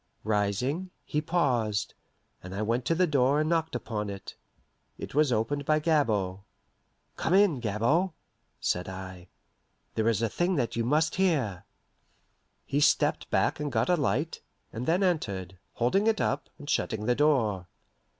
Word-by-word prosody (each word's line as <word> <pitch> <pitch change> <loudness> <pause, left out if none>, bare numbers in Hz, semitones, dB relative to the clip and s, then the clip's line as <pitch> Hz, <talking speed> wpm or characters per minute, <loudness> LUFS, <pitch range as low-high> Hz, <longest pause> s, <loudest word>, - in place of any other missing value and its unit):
Rising, 110 - 0 0.2
he 150 - -1
paused, 125 - 0 0.5
and 90 +1 -8
I 105 - -1
went 120 +3 0
to 165 - +2
the 185 +2 +3
door 140 -2 +2
and 155 - +1
knocked 160 -4 0
upon 110 -3 -3
it. 100 -1 -8 0.6
It - - -7
was 150 -1 +3
opened 125 +6 0
by 155 +2 +2
Gabord. 115 - +1 0.8
"Come 170 - +1
in, 195 -9 +4
Gabord," 120 - +1 0.5
said 90 +1 -1
I. 95 -1 -8 0.7
"There 110 0 0
is 115 0 0
a - - +3
thing 175 - 0
that 125 -6 -1
you 115 - 0
must 155 +7 +1
hear." 140 - +1 1.0
He 140 - 0
stepped 145 - +2
back - - +1
and 150 -1 -2
got 115 0 +1
a 180 - +5
light, 150 0 -1 0.3
and 120 +3 -4
then 175 +4 +2
entered, 95 - -1
holding 195 - +1
it 220 -2 +2
up, 145 - -1
and 145 - -11
shutting 110 -6 -1
the 125 - +3
door. 120 -11 +2
125 Hz, 160 wpm, -28 LUFS, 105-155 Hz, 1.0 s, a